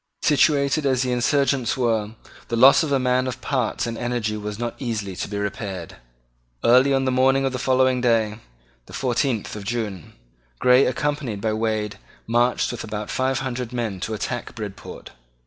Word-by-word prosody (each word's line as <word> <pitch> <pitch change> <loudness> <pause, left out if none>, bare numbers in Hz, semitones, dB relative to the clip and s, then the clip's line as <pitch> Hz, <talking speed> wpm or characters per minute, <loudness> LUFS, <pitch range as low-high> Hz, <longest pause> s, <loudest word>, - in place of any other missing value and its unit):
Situated 145 0 +3
as 130 -2 +2
the 125 - -1
insurgents 135 +1 +1
were, 110 -3 0 0.3
the 115 - -2
loss 130 +4 +7
of 155 -3 -2
a 140 - +4
man 130 0 +1
of 125 0 -4
parts 130 -2 -1
and 115 -1 -4
energy 120 -3 -1
was 105 -1 -5
not 120 0 -3
easily 110 -7 -3
to - - -3
be 100 - -5
repaired. 100 -3 -5 0.7
Early 130 +4 +5
on 135 -1 +2
the 130 - +1
morning 135 +1 +3
of 135 - -1
the 125 - -3
following 130 0 +2
day, 115 -3 +1 0.5
the - - -13
fourteenth 125 -4 -1
of 105 - -7
June, 105 -6 -4 0.4
Grey, 125 - +5
accompanied 135 -4 -2
by 110 +1 -1
Wade, 110 -1 -2 0.3
marched 120 +2 +1
with 120 - -6
about 105 -1 -5
five 130 0 0
hundred 125 -2 -4
men 115 -6 -3
to 110 +4 -3
attack 120 +3 -4
Bridport. 105 -3 -8
120 Hz, 175 wpm, -23 LUFS, 110-130 Hz, 0.7 s, loss